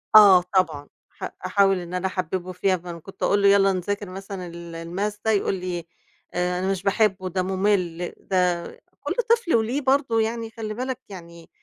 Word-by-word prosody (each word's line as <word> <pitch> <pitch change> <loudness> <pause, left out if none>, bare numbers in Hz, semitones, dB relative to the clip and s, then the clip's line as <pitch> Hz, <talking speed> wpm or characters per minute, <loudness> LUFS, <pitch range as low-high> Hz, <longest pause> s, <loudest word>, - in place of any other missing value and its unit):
آه 200 -4 +10
طبعًا. 155 -6 +1 0.2
ح - - -7 0.2
أحاول 195 -3 +3
إن 175 0 -8
أنا 180 +1 0
أحببُه 185 0 -3
فيها، 185 +1 +1
فكنت 175 +2 -9
أقول 200 0 +3
له 200 - +5
يالّا 195 -1 +5
نذاكر 200 +2 -3
مثلًا 195 -1 -7
ال 170 -1 -8
والmath 205 +4 -2
ده 220 - +3
يقول 200 -1 +1
لي: 180 -2 -4 0.5
"آآ 180 0 0
أنا 190 +1 0
مش 190 0 -3
باحبه 195 -2 +1
ده 185 +1 -1
ممل 185 -3 0
ده" 180 -2 +1 0.4
كل - - -1 0.2
طفل 460 - +3
وله 235 +6 +1
برضه 265 -4 +2
يعني 225 0 -2
خلّي 220 -1 -5
بالك 255 +2 -3
يعني. 170 -3 -11
190 Hz, 175 wpm, -24 LUFS, 180-210 Hz, 0.5 s, آه